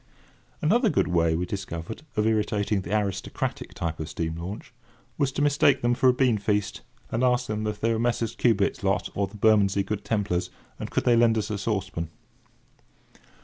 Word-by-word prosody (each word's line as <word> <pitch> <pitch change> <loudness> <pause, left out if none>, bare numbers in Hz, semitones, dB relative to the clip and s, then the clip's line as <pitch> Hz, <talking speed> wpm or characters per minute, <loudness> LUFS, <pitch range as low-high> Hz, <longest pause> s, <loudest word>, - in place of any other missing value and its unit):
Another 225 - +4
good - - +1
way 85 -2 +2
we 90 +2 -1
discovered 90 - -5 0.2
of 105 - +2
irritating 105 -2 +1
the 90 - -8
aristocratic 100 -2 -3
type 85 -1 -3
of 80 0 -4
steam 80 -1 -3
launch, 95 +8 -7 0.4
was 140 -1 0
to 145 - 0
mistake 145 -2 +3
them 120 0 +3
for 130 +1 +4
a - - +7
beanfeast, 105 -6 +1 0.3
and 115 +3 0
ask 125 0 +3
them 110 -1 -3
if 105 -1 -3
they 115 +1 +1
were 110 - -1
Messrs. 115 -1 0
Cubit's 105 -4 +1
lot 95 0 +1
or 100 -1 0
the 105 - -12
Bermondsey 100 -2 +3
Good 105 +1 -4
Templars, 100 -5 -1 0.3
and - - -5
could - - 0
they 120 - +4
lend 115 -1 +4
us 110 - -2
a 105 - -1
saucepan. 95 -6 -2
105 Hz, 185 wpm, -26 LUFS, 95-115 Hz, 0.4 s, a